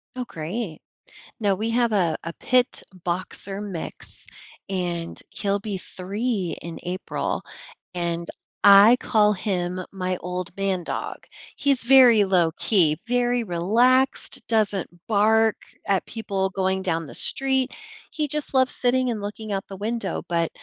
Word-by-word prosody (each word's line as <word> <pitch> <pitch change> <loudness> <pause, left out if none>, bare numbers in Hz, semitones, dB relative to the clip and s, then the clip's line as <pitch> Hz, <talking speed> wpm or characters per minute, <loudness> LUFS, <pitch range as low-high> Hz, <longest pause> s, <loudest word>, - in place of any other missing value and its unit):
Oh, 250 -1 -3
great. 170 +1 -5 0.6
No, 200 -3 +2
we 220 +4 -2
have 235 0 +2
a 175 -6 +2
a 170 - -5
pit-boxer 195 -5 -1
mix, 190 -6 -6 0.4
and 175 -3 -3
he'll 200 -1 -1
be 200 -1 -4
3 195 +1 -3
in 170 -1 -7
April. 180 +2 -3 0.5
And 170 -1 -2 0.4
I 200 +4 +9
call 210 -3 +3
him 185 -2 -2
my 185 -1 -2
old 180 0 -4
man 195 -2 0
dog. - - -4 0.4
He's 275 -4 +1
very 245 -4 +7
low 180 -4 +3
key, 165 -8 +3
very 245 0 +1
relaxed, 230 +9 +2
doesn't 210 -4 +1 0.2
bark 220 +1 +4 0.3
at 195 -2 +2
people 195 -4 -2
going 190 0 0
down 165 -3 -1
the - - -10
street. 265 -1 0 0.4
He 305 -2 -1
just 300 0 -4
loves 260 -1 +3
sitting 250 0 +1
and 215 -3 -4
looking 210 +1 -6
out 195 -1 -2
the 195 - -7
window, 210 -2 -3
but 170 -1 0
200 Hz, 135 wpm, -24 LUFS, 180-235 Hz, 0.6 s, I